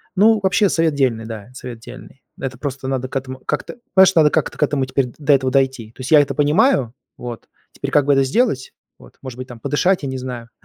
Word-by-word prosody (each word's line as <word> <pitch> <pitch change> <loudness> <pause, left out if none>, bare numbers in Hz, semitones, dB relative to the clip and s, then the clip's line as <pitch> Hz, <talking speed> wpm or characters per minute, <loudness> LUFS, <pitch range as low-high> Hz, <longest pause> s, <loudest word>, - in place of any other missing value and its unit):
Ну, 215 +3 +5
вообще 190 +2 +3
совет 165 -3 +1
дельный, 120 -5 0
да. 110 0 -8
Совет 125 -3 -8
дельный. 125 +3 -13 0.2
Это 130 -2 -5
просто 135 -2 -5
надо 130 -1 -2
к - - -11
этому 130 0 -4
как-то, 150 - -3 0.2
понимаешь, 190 0 +6
надо 155 -2 +6
как-то 160 - -1
к - - +1
этому 140 -2 0
теперь 130 0 0
д 120 - -14
до 145 -1 +3
этого 130 -1 +2
дойти. 130 -4 0
То - - -12
есть 130 +5 -6
я 150 - +8
это 140 -1 -2
понимаю. 150 - +2 0.2
Вот. 120 -2 -8 0.3
Теперь - - -5
как 145 -2 +3
бы 145 - +4
это 135 0 +3
сделать? 135 - 0 0.3
Вот. - - -18
Может 130 -2 -8
быть, 130 - -6
там 120 -2 -10
подышать, 180 - +1
я 135 - -2
не 130 - -4
знаю, 125 -2 -7
135 Hz, 235 wpm, -19 LUFS, 125-150 Hz, 0.3 s, я